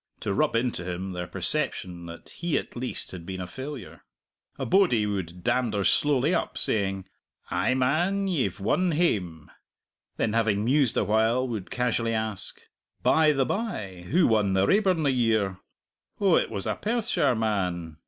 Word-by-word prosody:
to - - -2
rub 150 +2 +1
into 115 -6 0
him 90 +2 -4
their 90 -1 -5
perception 85 -2 -2
that 85 0 -10
he 170 -4 -2
at - - -5
least 125 +1 -3
had 90 -3 -8
been 95 +2 -6
a 90 - -4
failure. 130 +8 -8 0.6
A - - -3
bodie 175 - +3
would 90 -4 -4
dander 115 -6 +1
slowly 145 - +2
up, - - -1
saying, 95 -3 +1 0.5
"Ay, 130 - +1
man, 175 +10 +1
ye've 160 - -1
won 170 - +1
hame!" 95 - -1 0.7
Then, 110 - 0
having 110 -2 +1
mused 135 -1 +2
awhile, 110 +5 +2
would 110 -6 -5
casually 115 -2 0
ask, 110 -3 -4 0.4
"By 155 -1 +5
the 135 -3 +1
bye, 105 - -4
who 170 +2 +4
won 105 -4 +2
the 95 0 +3
Raeburn 190 - +2
the 140 - +3
year? 110 -7 +1 0.6
Oh, 195 -4 +4
it - - +2
was 100 -3 -4
a - - 0
Perthshire 230 - +1
man! 90 -7 -2
115 Hz, 160 wpm, -26 LUFS, 95-145 Hz, 0.7 s, By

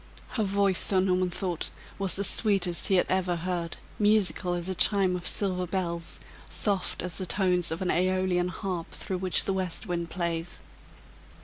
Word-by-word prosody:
Her 230 - -2
voice, 200 -2 +2
Sir 190 - +3
Norman 185 -1 +2
thought, 175 -2 -2 0.3
was 195 -2 +2
the 200 - 0
sweetest 195 -5 +2
he 195 - +3
had 180 - +4
ever 185 -1 0
heard, 170 -1 -3 0.2
musical 205 -4 +3
as 175 0 -2
a 190 - 0
chime 190 -1 +3
of 180 0 -4
silver 185 -3 0
bells, 170 -2 -3 0.3
soft 200 -4 0
as 180 -2 +3
the 185 - -2
tones 180 -3 +1
of 165 +3 -3
an 180 - +1
aeolian 185 0 +1
harp 180 -1 -4
through 190 -3 -4
which 185 -1 +3
the 195 - -1
west 185 -3 -3
wind 170 -1 -3
plays. 170 -1 -3
185 Hz, 175 wpm, -28 LUFS, 175-190 Hz, 0.3 s, had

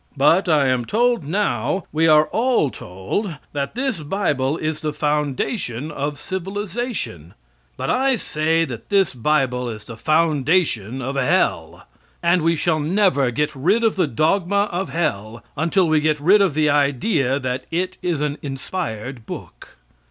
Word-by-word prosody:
But 165 +7 +4
I 150 -3 +4
am 130 -2 +1
told 240 - +1
now, 160 - -1
we 160 +2 +2
are 155 -1 +6
all 230 - +1
told 95 - -4 0.2
that 140 +4 -3
this 260 -5 -1
Bible 150 -4 -1
is 155 -1 -3
the 155 -1 -3
foundation 150 - -2
of 145 0 -3
civilization, 190 - -5 0.4
but - - -1
I 265 +1 +2
say 160 -5 0
that 120 -5 -8
this 195 -6 +2
Bible 125 -1 0
is 105 -2 -7
the 115 - -9
foundation 150 - +1
of 135 +2 -3
Hell, 130 -2 0 0.4
and 170 +1 +3
we 165 +1 +2
never 160 -1 +2
shall 125 - 0
get 150 +5 -1
rid 190 - +2
of 225 - +2
the 185 -5 +1
dogma 180 - +1
of 185 +2 -2
hell 115 -9 -2
until 170 +4 +2
we 155 -1 +3
get 155 0 +1
rid 190 +8 +5
of 185 -7 +2
the 155 -1 +2
idea 140 - +2
that 130 -1 -3
it 185 +3 -2
is 170 -5 -1
an 150 0 -2
inspired 135 - -5
book. - - -10
155 Hz, 155 wpm, -21 LUFS, 135-185 Hz, 0.4 s, are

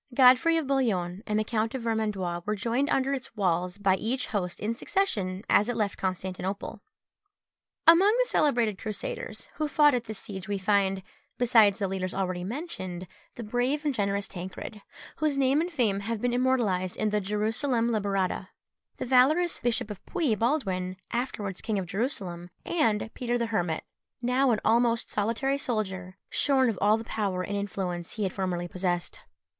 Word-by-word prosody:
Godfrey 265 +6 +6
of 320 - 0
Bouillon 205 -10 0
and 210 -1 +1
the 215 - +2
Count 225 +2 -1
of 255 - -4
Vermandois 210 -6 -1
were 210 +3 -1
joined 235 +7 0
under 270 +1 +1
its 260 -4 -4
walls 180 -2 0
by 195 -2 +2
each 250 +6 -1
host 180 -3 -2
in 215 +2 -1
succession 210 - -1
as 210 - +4
it 245 - -1
left 210 -3 -1
Constantinople. 190 +1 -3 1.0
Among 335 +4 +8
the - - +2
celebrated 240 - +2
Crusaders 475 - -5
who 310 - 0
fought 295 -1 +5
at 245 -2 -1
this 220 -1 -6
siege 190 -2 -6
we 205 -1 -1
find, 195 -1 +1 0.3
besides 225 -5 +5
the 200 - -1
leaders 185 -1 -3
already 185 -2 -2
mentioned, 190 - -5 0.3
the 235 - -6
brave 245 +7 -1
and 290 - +1
generous 200 -2 0
Tancred, 190 +4 -7 0.4
whose 305 -2 0
name 275 +2 +3
and 350 +2 -3
fame 220 - +1
have 220 +2 -3
been 245 +2 0
immortalised 235 -8 +1
in 215 -1 0
the 210 0 +1
Gerusalemme 220 +4 0
Liberata, 195 -3 -1 0.5
the - - -3
valorous 280 +8 +4
Bishop 230 -3 0
of 200 - -9
Puy, 320 -10 +1
Baldwin, 195 -7 -1
afterwards 215 -6 -3
king 220 -2 -1
of 190 - -2
Jerusalem, 180 -4 -3 0.2
and 225 -9 +1
Peter 245 -1 -1
the 235 - 0
Hermit, 175 -8 -1 0.4
now 250 +2 +2
an 225 -3 +2
almost 230 +1 +2
solitary 235 +7 0
soldier, 190 -7 -3
shorn 265 -4 +3
of 200 - -7
all 210 +2 +5
the 225 - -6
power 195 -5 -2
and 205 - -3
influence 185 -4 -3
he 215 - -3
had 190 - -1
formerly 180 -2 -2
possessed. 175 -1 -2
215 Hz, 170 wpm, -28 LUFS, 190-250 Hz, 1.0 s, Among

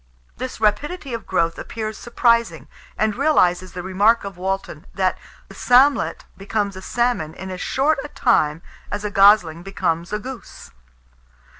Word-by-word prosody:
This 255 0 -6
rapidity 265 +7 -1
of 230 -3 -6
growth 165 -2 0
appears 220 -1 -5
surprising, 235 -1 +1 0.3
and 215 -1 +1
realizes 185 - +2
the 180 - -6
remark 205 +5 +2
of 200 -1 -7
Walton, 185 -3 -4
that 185 -2 +1 0.3
"the - - -13
salmlet 260 0 +3
becomes 200 0 -2
a 190 - -8
salmon 235 -8 -1
in 190 0 -7
as 180 -1 -6
short 285 +3 +1
a - - -6
time 165 - +1 0.3
as 205 +1 -4
a 210 - -2
gosling 195 -5 +5
becomes 175 -2 -2
a 210 - 0
goose." 250 +3 -10
205 Hz, 150 wpm, -21 LUFS, 185-240 Hz, 0.3 s, gosling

